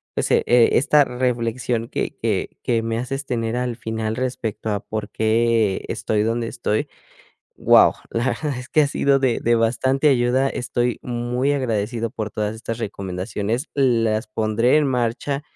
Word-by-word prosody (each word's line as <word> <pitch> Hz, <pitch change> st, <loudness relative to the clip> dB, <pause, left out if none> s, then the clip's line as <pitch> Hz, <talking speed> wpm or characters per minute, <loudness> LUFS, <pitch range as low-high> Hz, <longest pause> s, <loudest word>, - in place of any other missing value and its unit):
pues, -, -, -1 dB
e -, -, +4 dB
esta 125 Hz, +4 st, +5 dB
reflexión 120 Hz, -1 st, -1 dB
que -, -, -3 dB
que -, -, -2 dB
que 115 Hz, -2 st, +1 dB
me 115 Hz, 0 st, -2 dB
haces 135 Hz, +3 st, -4 dB
tener 115 Hz, -1 st, -2 dB
al 125 Hz, -1 st, -2 dB
final 110 Hz, -1 st, -3 dB
respecto 115 Hz, -4 st, -3 dB
a 100 Hz, -, -1 dB
por 110 Hz, -1 st, -5 dB
qué 110 Hz, -2 st, +1 dB
estoy 110 Hz, -2 st, -1 dB
donde 115 Hz, +1 st, -1 dB
estoy. 110 Hz, -2 st, -2 dB, 0.7 s
Wao, -, -, +6 dB, 0.2 s
la 115 Hz, +1 st, -1 dB
verdad 130 Hz, +2 st, -2 dB
es 125 Hz, -, -9 dB
que 155 Hz, -, +4 dB
ha 145 Hz, -, +3 dB
sido 140 Hz, -1 st, +2 dB
de 130 Hz, -3 st, +1 dB
de 120 Hz, 0 st, +2 dB
bastante 130 Hz, +5 st, +2 dB
ayuda. 130 Hz, +1 st, +2 dB
Estoy 120 Hz, -1 st, -2 dB
muy 125 Hz, +3 st, -1 dB
agradecido 115 Hz, -3 st, -2 dB
por 110 Hz, -1 st, -4 dB
todas 105 Hz, +1 st, -2 dB
estas 115 Hz, 0 st, -5 dB
recomendaciones, 100 Hz, -, -3 dB
las 115 Hz, -5 st, +1 dB
pondré 110 Hz, +4 st, +2 dB
en 150 Hz, -, +2 dB
marcha 130 Hz, +3 st, -1 dB
120 Hz, 160 wpm, -22 LUFS, 110-125 Hz, 0.7 s, Wao